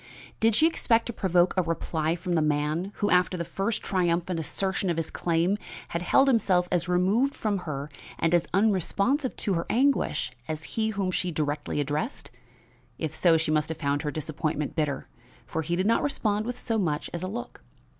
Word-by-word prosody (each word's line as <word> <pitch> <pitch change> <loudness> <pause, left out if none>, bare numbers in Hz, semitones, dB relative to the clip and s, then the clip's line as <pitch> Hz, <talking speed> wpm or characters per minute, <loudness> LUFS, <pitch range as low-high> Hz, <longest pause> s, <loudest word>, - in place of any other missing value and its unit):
Did 225 -1 +4
she 310 - +5
expect 235 -8 +2
to 235 - -4
provoke 180 -3 +2
a 185 - +3
reply 165 -1 -1
from 175 +1 -3
the 165 - +3
man 155 +5 0
who, 205 - 0
after 180 0 +3
the 170 - -3
first 205 +6 -2
triumphant 175 -2 0
assertion 190 +4 -1
of 170 - 0
his 165 - -2
claim, 170 +4 +1 0.3
had 170 - -2
held 270 +10 +4
himself 195 -8 +3
as 180 -1 +1
removed 195 +10 +2
from 205 -3 -1
her 140 0 -3 0.3
and 165 +1 +1
as 175 -1 +3
unresponsive 210 - +1
to 200 - 0
her 170 -1 -1
anguish 270 - +1 0.2
as 155 0 -3
had - - -6
he 220 -1 0
whom 195 -3 -1
she 180 0 -1
directly 150 -2 -2
addressed? 150 - -2 0.7
If 160 -3 -3
so, 170 -3 +4
she 160 -1 0
must 155 +1 +1
have 160 - -4
found 145 -2 0
her 150 - -2
disappointment 155 -1 -3
bitter, 150 -4 -1 0.4
for 160 - -3
he 170 +2 -1
did 185 +2 0
not 230 +2 +3
respond 215 -6 0
with 245 0 -3
so 225 -3 -1
much 155 -6 -1
as 170 - -4
a 185 - -2
look. 235 +5 -6
180 Hz, 195 wpm, -27 LUFS, 160-205 Hz, 0.7 s, she